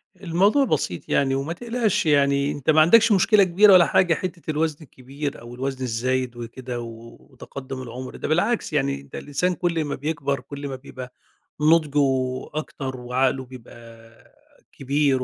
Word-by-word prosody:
الموضوع 200 - +2
بسيط 140 - -2
يعني 135 -1 +2
وما 140 +5 -2
تقلقش 230 -2 -1
يعني 140 -1 +2
أنتَ 145 0 -5
ما 155 0 +6
عندكش 225 +8 +6
مشكلة 205 +1 +5
كبيرة 195 +3 +5
ولا 175 -2 +7
حاجة، 175 -3 +3
حتَّة 170 -2 -4
الوزن 155 0 -1
الكبير 140 0 -7
أو 120 +1 -10
الوزن 130 +1 -4
الزايد 125 +1 -1
وكده، 120 +1 -6
و 115 0 -10
وتقدُّم 130 0 -9
العُمر، 125 +1 -8
ده - - -5
بالعكس 175 +6 0
يعني، 140 -1 0
ده 140 -1 -9
الإنسان 180 +6 -1
كل 170 -3 -1
ما 145 - -3
بيكبر 145 -1 -2
كل 140 +2 -8
ما 135 - -5
بيبقى 130 -1 -10 0.5
نضجه 155 -2 +3 0.5
أكتر 135 -3 -5
وعقله 130 +1 0
بيبقى 115 -2 -15 0.4
كبير 135 -1 0
140 Hz, 155 wpm, -23 LUFS, 130-165 Hz, 0.5 s, ولا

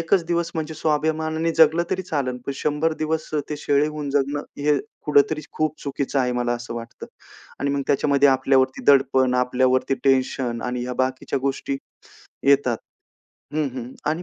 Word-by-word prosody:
1चं 170 - +2
दिवस 170 -1 0
म्हणजे 160 0 -3
स्वाभिमानाने 160 +1 0
जगलं 160 +1 +5
तरी 185 - -1
चालेल, 140 -7 -2
पण 140 - -1
100 150 +3 0
दिवस 155 0 -2
अ, 150 - +2
ते 150 - -3
शेळी 145 0 +2
होऊन 150 -2 -4
जगणं 145 +1 0 0.2
हे 145 -1 +3 0.3
कुठेतरी 150 +1 +3
खूप 155 -1 -1
चुकीचं 140 0 -2
आहे, 125 -1 +1
मला 120 0 0
असं 120 0 -6
वाटतं 115 0 -8 0.5
आणि 140 - 0
मग 140 0 0
त्याच्यामध्ये 140 0 +3
आपल्यावरती 130 0 +2
दडपण, 130 -2 +3
आपल्यावरती 130 +1 +2
टेन्शन 130 -3 +1
आणि 125 0 -3
ह्या 125 0 -4
बाकीच्या 130 +1 -3
गोष्टी 135 0 -2 0.7
येतात 135 -4 +4 0.8
हं, 155 -2 +1
हं, 125 0 -6 0.2
आणि 160 +3 -2
140 Hz, 160 wpm, -23 LUFS, 130-155 Hz, 0.8 s, जगलं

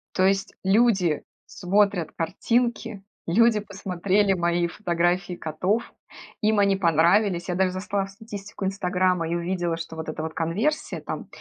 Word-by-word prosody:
То 185 - +3
есть 195 0 +1
люди 190 -5 +3 0.2
смотрят 195 -3 +1
картинки, 230 +4 -1 0.2
люди 220 +5 +4
посмотрели 200 0 0
мои 175 -1 +1
фотографии 175 0 0
котов, 180 +8 -2 0.5
им 215 -1 +3
они 200 -1 +3
понравились. 175 +2 +3
Я 180 - 0
даже 185 0 +2
зашла 195 +1 -2
в - - -12
статистику 205 -2 -8
"Инстаграма" 185 -2 0
и 170 - 0
увидела, 175 -1 -1
что 165 0 -7
вот 160 - -5
эта 155 0 -4
вот 160 - -4
конверсия- 205 - -1
там - - -6
185 Hz, 140 wpm, -25 LUFS, 170-205 Hz, 0.5 s, люди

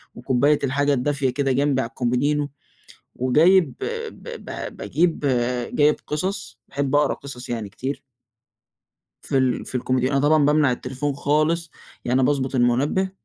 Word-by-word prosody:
وكوباية 135 +4 +2
الحاجة 145 +2 +1
الدافية 135 +1 0
كده 135 +1 0
جنبي 135 0 +2
على 115 - -4
الكومودينو 140 +4 0 0.7
وجايب 155 +5 +4 0.4
ب - - -15 0.2
ب - - -6
باجيب 170 0 0 0.5
جايب 150 0 +4
قِصَص، 150 - -3
باحب 140 0 -1
أقرا 145 -1 +3
قِصَص 135 -3 -9
يعني 115 -4 -3
كتير. 130 +8 -5 1.2
في 135 - 0
ال 130 -2 +1
في - - -8
الكومودينو. 130 +1 0
أنا 140 - +2
طبعًا 150 +1 +4
بامنع 150 -3 +3
التليفون 135 +3 -3
خالص، 155 +4 0 0.3
يعني 130 +2 +2
باضبُط 135 0 +1
المُنبّه 130 +10 +2
140 Hz, 135 wpm, -23 LUFS, 130-150 Hz, 1.2 s, وجايب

